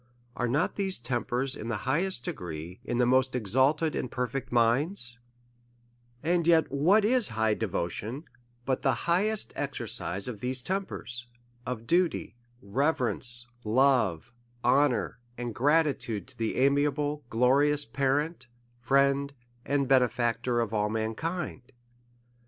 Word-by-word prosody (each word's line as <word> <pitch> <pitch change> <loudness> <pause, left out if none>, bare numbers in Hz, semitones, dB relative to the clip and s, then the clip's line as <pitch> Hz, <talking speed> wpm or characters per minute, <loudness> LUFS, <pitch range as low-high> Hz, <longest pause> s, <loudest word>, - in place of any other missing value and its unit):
Are 125 - -1
not 145 +9 0
these 195 -2 0
tempers, 125 +2 -2
in 110 - -7
the 115 -2 -1
highest 150 -1 0
degree, 85 +1 -6
in 120 - -2
the 125 - +3
most 130 +1 +2
ex 110 -6 -3
alted 150 +5 +3
and 125 - -3
perfect 125 +2 -3
minds 120 - +1 0.5
'{ 120 0 -36
And 170 +1 +1
yet 160 -4 +4
what 180 +10 +4
is 245 0 +5
high 110 0 +1
de 110 +1 -2
votion, 105 - -4 0.4
but 130 -1 0
the 130 -5 0
highest 200 +5 +1
exercise 95 +5 -3
of 115 -5 -5
these 125 +2 -1
tempers, 120 - -4 0.4
of 115 -3 -4
duty, 175 -3 +1 0.3
reverence, 120 0 -1 0.2
love, 120 - +2 0.3
honour, 125 -1 +2 0.2
and 120 -1 -4
gratitude 140 -5 +1
to 130 - -7
the 115 -1 -1
amiable, 145 +2 +1
glorious 140 +5 +3
parent, 140 +3 -1 0.3
friend, 140 +2 +2 0.3
and 140 -1 0
benefactor 120 -1 +2
of 115 -2 -3
all 105 -1 +1
mankind? 130 +9 -3
130 Hz, 130 wpm, -28 LUFS, 120-145 Hz, 0.5 s, is